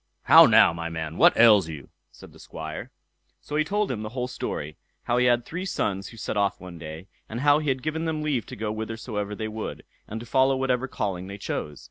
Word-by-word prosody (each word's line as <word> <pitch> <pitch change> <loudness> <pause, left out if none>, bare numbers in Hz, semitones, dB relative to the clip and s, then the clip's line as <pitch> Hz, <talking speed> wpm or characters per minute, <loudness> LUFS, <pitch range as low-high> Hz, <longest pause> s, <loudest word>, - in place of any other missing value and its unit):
"How - - +9
now, - - +6
my 85 0 -4
man! 80 -1 -5
what - - +5
ails 105 -6 +6
you?" 75 -4 -8 0.2
said - - -15
the - - -17
Squire. 80 0 -7 0.5
So 150 - -7
he 155 - +3
told 205 +3 -1
him 110 -4 -3
the 110 - -5
whole 125 0 -1
story; 75 -10 -5 0.3
how 120 - 0
he 125 0 +4
had 120 -1 +2
three 180 +3 -5
sons 100 - -2
who 115 - -12
set 110 - -4
off 100 -1 0
one 90 -2 -10
day, 80 +3 -8 0.2
and 115 +3 -4
how 145 +1 +5
he 150 -2 -2
had 130 -1 -1
given 160 +2 -2
them 155 -1 -2
leave 140 -8 -1
to - - -8
go 105 0 -3
whithersoever 110 -2 -4
they 110 +1 -4
would, 110 0 -6 0.2
and 110 - -5
to 120 - -9
follow 130 +2 +3
whatever 130 -1 0
calling 95 -7 -3
they 100 +1 -7
chose. 75 -7 -5
110 Hz, 230 wpm, -25 LUFS, 95-130 Hz, 0.5 s, How